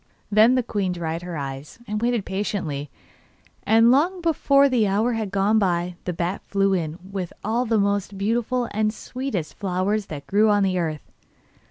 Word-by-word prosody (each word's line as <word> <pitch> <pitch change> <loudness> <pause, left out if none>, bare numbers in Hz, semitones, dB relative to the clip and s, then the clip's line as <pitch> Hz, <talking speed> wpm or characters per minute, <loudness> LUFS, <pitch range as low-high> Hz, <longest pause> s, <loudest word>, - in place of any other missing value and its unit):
Then 220 +4 +6
the 255 - +2
queen 200 -5 -1
dried 165 -1 -3
her 175 -2 -6
eyes, 135 +1 -6
and 210 +1 -3
waited 235 -3 0
patiently, 180 -8 -3 0.7
and 225 +2 +5
long 340 +8 +2
before 280 -4 +3
the 240 -6 +2
hour 215 +5 +1
had 220 -3 -2
gone 200 +3 +2
by 175 -2 0
the 180 - -1
bat 175 +3 -2
flew 195 0 +2
in 165 -3 -2
with 190 -3 -4
all 235 +4 0
the 225 0 +2
most 200 -1 0
beautiful 235 +4 0
and 215 0 +1
sweetest 225 - -5
flowers 195 +2 -1
that 145 -2 -7
grew 210 +8 +3
on 205 -1 +3
the 185 -1 +1
earth. 155 -3 -3
200 Hz, 175 wpm, -23 LUFS, 180-225 Hz, 0.7 s, Then